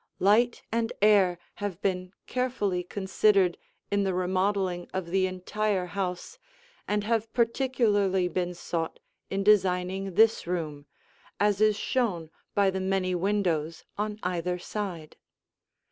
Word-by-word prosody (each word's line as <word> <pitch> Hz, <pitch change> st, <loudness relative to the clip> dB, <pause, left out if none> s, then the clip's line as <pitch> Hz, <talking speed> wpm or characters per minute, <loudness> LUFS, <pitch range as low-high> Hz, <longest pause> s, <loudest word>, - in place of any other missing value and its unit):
Light 225 Hz, +5 st, +3 dB
and 230 Hz, 0 st, 0 dB
air 200 Hz, -4 st, +5 dB, 0.2 s
have 200 Hz, -4 st, -4 dB
been 185 Hz, -2 st, -1 dB
carefully 240 Hz, -8 st, -1 dB
considered 190 Hz, 0 st, +2 dB, 0.4 s
in 200 Hz, 0 st, +2 dB
the 190 Hz, -2 st, 0 dB
remodeling 185 Hz, 0 st, 0 dB
of 180 Hz, -3 st, -3 dB
the 190 Hz, 0 st, +3 dB
entire 185 Hz, +1 st, -1 dB
house 185 Hz, -, -4 dB, 0.5 s
and 210 Hz, 0 st, 0 dB
have 225 Hz, 0 st, 0 dB
particularly 230 Hz, -6 st, +2 dB
been 180 Hz, 0 st, -2 dB
sought 165 Hz, -1 st, -3 dB, 0.3 s
in 195 Hz, +1 st, -1 dB
designing 190 Hz, -2 st, +2 dB
this 220 Hz, -3 st, +4 dB
room, 155 Hz, -5 st, -3 dB, 0.5 s
as 205 Hz, 0 st, +2 dB
is 215 Hz, -1 st, +5 dB
shown 190 Hz, -11 st, -1 dB, 0.2 s
by 200 Hz, -1 st, +4 dB
the 190 Hz, 0 st, -3 dB
many 190 Hz, -1 st, 0 dB
windows 175 Hz, -4 st, 0 dB
on 210 Hz, 0 st, -2 dB
either 180 Hz, 0 st, -1 dB
side. 175 Hz, -4 st, -5 dB
190 Hz, 125 wpm, -28 LUFS, 180-210 Hz, 0.5 s, air